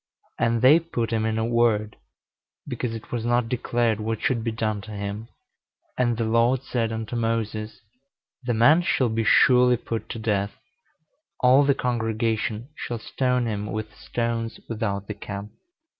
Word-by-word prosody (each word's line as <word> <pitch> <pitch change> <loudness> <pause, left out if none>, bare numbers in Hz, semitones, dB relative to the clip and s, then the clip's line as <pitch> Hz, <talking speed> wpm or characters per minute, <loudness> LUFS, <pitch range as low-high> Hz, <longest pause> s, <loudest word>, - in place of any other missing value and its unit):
And 115 0 +1
they 145 +6 +8
put 120 -9 -3
him 110 0 +1
in 110 +1 -1
ward, 110 -3 +2 0.7
because 120 -3 -3
it 110 - -10
was 120 -2 -2
not 120 0 +1
declared 120 -2 0
what 110 0 -2
should 115 -3 0
be 115 - -1
done 110 -2 -2
to 110 +2 -10
him. 100 +2 -5 0.7
And 120 -2 +1
the 115 - 0
Lord 115 +3 +2
said 115 -3 -1
unto 110 +1 -4
Moses, 115 -2 -2 0.6
The 120 -2 -1
man 145 +10 +6
shall 130 -7 +1
be 110 +1 0
surely 125 +2 +5
put 115 -1 -5
to - - -5
death: 105 -2 -1 0.9
all 130 +3 +6
the 140 -1 +3
congregation 115 -1 -1
shall 120 - -4
stone 125 +2 0
him 105 -2 -3
with 110 -1 -5
stones 115 -1 -3
without 105 -3 -2
the 105 - -5
camp. 100 0 -7
115 Hz, 160 wpm, -25 LUFS, 110-120 Hz, 0.9 s, they